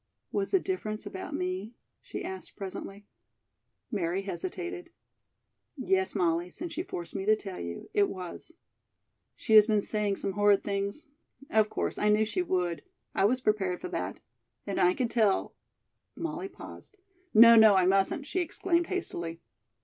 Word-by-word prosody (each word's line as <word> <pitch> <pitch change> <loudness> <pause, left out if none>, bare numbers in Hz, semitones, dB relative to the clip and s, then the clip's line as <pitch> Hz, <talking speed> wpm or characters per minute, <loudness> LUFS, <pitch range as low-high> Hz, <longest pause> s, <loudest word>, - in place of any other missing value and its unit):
"Was 200 -1 -1
the 385 - +3
difference 220 - -4
about 195 -2 -6
me?" 185 +5 -3 0.3
she - - -6
asked 190 -1 -7
presently. 195 +1 -7 0.9
Mary 190 -2 -1
hesitated. 355 - -5 0.9
"Yes, 190 -7 0
Molly; 170 0 +1
since 340 - -7
you 345 - -2
force 175 - -6
me 195 - -3
to 215 +1 +5
tell 195 -3 -7
you, 85 0 -6
it 200 -1 +3
was." 185 - -8 0.8
"She 220 - -2
has 215 -1 +9
been 210 -2 +2
saying 210 -2 0
some 195 - -3
horrid 205 0 +3
things? 200 +8 -3 0.5
Of 215 -1 +3
course, - - -2
I 210 - +2
knew 210 +1 +4
she 230 +12 -1
would. 180 - -1 0.3
I 195 - +2
was 250 +5 +2
prepared 195 -5 0
for 360 - -6
that. - - -3 0.5
And 200 - -2
I 180 +1 +4
could 240 -3 -1
tell 215 -5 +2 0.3
" - - -53
Molly 330 +4 -4
paused. 410 +2 -12 0.3
"No, 230 +1 +9
no, 220 -2 +8
I 185 -1 +4
mustn't!" 195 +9 +2
she 370 - -2
exclaimed 345 0 0
hastily. 170 - -4
205 Hz, 160 wpm, -29 LUFS, 190-255 Hz, 0.9 s, has